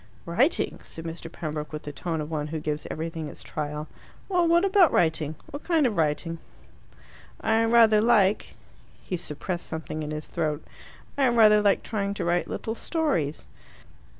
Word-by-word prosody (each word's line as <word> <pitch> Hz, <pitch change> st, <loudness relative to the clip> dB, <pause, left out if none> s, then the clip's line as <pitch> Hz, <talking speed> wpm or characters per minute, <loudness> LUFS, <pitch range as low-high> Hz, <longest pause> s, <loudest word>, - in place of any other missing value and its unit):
"Writing?" 240 Hz, -, +1 dB
said 165 Hz, -, -9 dB
Mr. 165 Hz, 0 st, -6 dB
Pembroke, 150 Hz, -3 st, -5 dB
with 150 Hz, -1 st, -6 dB
the 145 Hz, -, -6 dB
tone 160 Hz, +2 st, -3 dB
of 150 Hz, +1 st, -6 dB
one 150 Hz, -2 st, -2 dB
who 160 Hz, +1 st, -4 dB
gives 150 Hz, 0 st, -3 dB
everything 160 Hz, 0 st, -4 dB
its -, -, -10 dB
trial. 150 Hz, 0 st, -4 dB, 0.4 s
"Well, 355 Hz, -3 st, +3 dB
what 340 Hz, +3 st, +4 dB
about 385 Hz, -5 st, +5 dB
writing? 160 Hz, -2 st, +1 dB, 0.2 s
What 285 Hz, -, -7 dB
kind 325 Hz, -4 st, +2 dB
of 230 Hz, -4 st, +1 dB
writing?" 165 Hz, +1 st, 0 dB, 1.0 s
"I 220 Hz, +1 st, +2 dB
rather 225 Hz, -2 st, +6 dB
like," 215 Hz, -3 st, +3 dB, 0.5 s
he 185 Hz, -, -3 dB
suppressed 175 Hz, +1 st, -4 dB
something 160 Hz, -1 st, -5 dB
in 150 Hz, -, -4 dB
his 150 Hz, 0 st, -5 dB
throat, 155 Hz, -2 st, -2 dB, 0.5 s
"I 270 Hz, -, +5 dB
rather 215 Hz, -3 st, +6 dB
like 200 Hz, -1 st, +3 dB
trying 200 Hz, -2 st, -2 dB
to -, -, -3 dB
write 175 Hz, +1 st, +1 dB
little 225 Hz, -, -4 dB
stories." 230 Hz, -, -1 dB
170 Hz, 165 wpm, -26 LUFS, 155-225 Hz, 1.0 s, rather